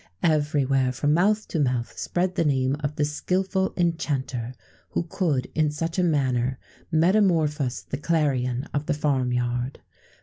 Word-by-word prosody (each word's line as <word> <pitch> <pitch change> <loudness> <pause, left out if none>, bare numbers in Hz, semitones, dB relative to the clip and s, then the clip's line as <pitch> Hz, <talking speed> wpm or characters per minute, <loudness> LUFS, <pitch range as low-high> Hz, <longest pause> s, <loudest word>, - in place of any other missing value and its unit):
Everywhere, 145 -4 +2
from 145 +4 +1
mouth 210 +6 +2
to 165 - -1
mouth, 125 -4 0
spread 180 +1 -1
the 170 - +1
name 135 -2 +1
of 150 0 -3
the 150 - +1
skilful 190 +5 0
enchanter, 140 -8 -1 0.3
who - - -1
could 165 -7 -1
in 155 -1 +2
such 165 +4 -3
a - - +3
manner 130 -6 +1 0.3
metamorphose 160 - +2
the 135 - -5
clarion 135 -6 0
of 145 +1 -2
the - - +1
farm 135 -4 0
yard. 125 +1 -1
150 Hz, 145 wpm, -25 LUFS, 130-165 Hz, 0.3 s, a